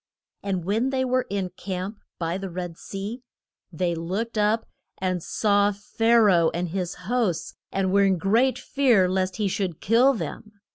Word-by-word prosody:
And 190 Hz, -4 st, -2 dB
when 220 Hz, +7 st, +1 dB
they 260 Hz, -1 st, 0 dB
were 255 Hz, 0 st, 0 dB
in 195 Hz, -3 st, -2 dB
camp 190 Hz, +3 st, -5 dB, 0.2 s
by 170 Hz, +2 st, -2 dB
the 195 Hz, -1 st, -5 dB
Red 175 Hz, -1 st, -5 dB
Sea, 205 Hz, +8 st, -6 dB, 0.5 s
they 175 Hz, +1 st, -1 dB
looked 190 Hz, +8 st, -3 dB
up 215 Hz, +1 st, +2 dB, 0.3 s
and 185 Hz, -1 st, -1 dB
saw 205 Hz, +2 st, +2 dB
Pha 225 Hz, +3 st, +1 dB
ra 205 Hz, -5 st, +5 dB
oh -, -, +4 dB
and 175 Hz, 0 st, -2 dB
his 180 Hz, 0 st, -3 dB
hosts, 225 Hz, -6 st, 0 dB, 0.2 s
and 190 Hz, -1 st, 0 dB
were 200 Hz, 0 st, +5 dB
in 190 Hz, -1 st, +3 dB
great 230 Hz, +9 st, +2 dB
fear 255 Hz, -8 st, +3 dB
lest 185 Hz, 0 st, 0 dB
he 210 Hz, -2 st, 0 dB
should 185 Hz, -3 st, -2 dB
kill 240 Hz, +6 st, +4 dB
them. 215 Hz, -1 st, -6 dB
195 Hz, 175 wpm, -25 LUFS, 185-225 Hz, 0.5 s, ra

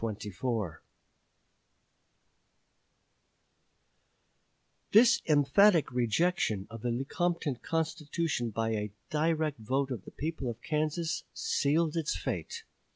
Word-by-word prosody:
This 230 Hz, +3 st, +7 dB
emphatic 155 Hz, +4 st, +5 dB
rejection 120 Hz, -, +1 dB
of 115 Hz, -1 st, -8 dB
the 120 Hz, -, -1 dB
Lecompton 145 Hz, +3 st, -1 dB
Constitution 160 Hz, -4 st, -2 dB
by 115 Hz, +1 st, -1 dB
a 105 Hz, -2 st, -2 dB, 0.2 s
direct 155 Hz, -2 st, 0 dB
vote 130 Hz, +5 st, -1 dB
of 115 Hz, -7 st, -4 dB
the -, -, -8 dB
people 150 Hz, -4 st, -3 dB
of 115 Hz, -, -6 dB
Kansas 155 Hz, +2 st, -1 dB
sealed 155 Hz, +3 st, +1 dB
its 160 Hz, -, 0 dB
fate. 90 Hz, -3 st, -4 dB
145 Hz, 90 wpm, -30 LUFS, 120-165 Hz, 0.2 s, This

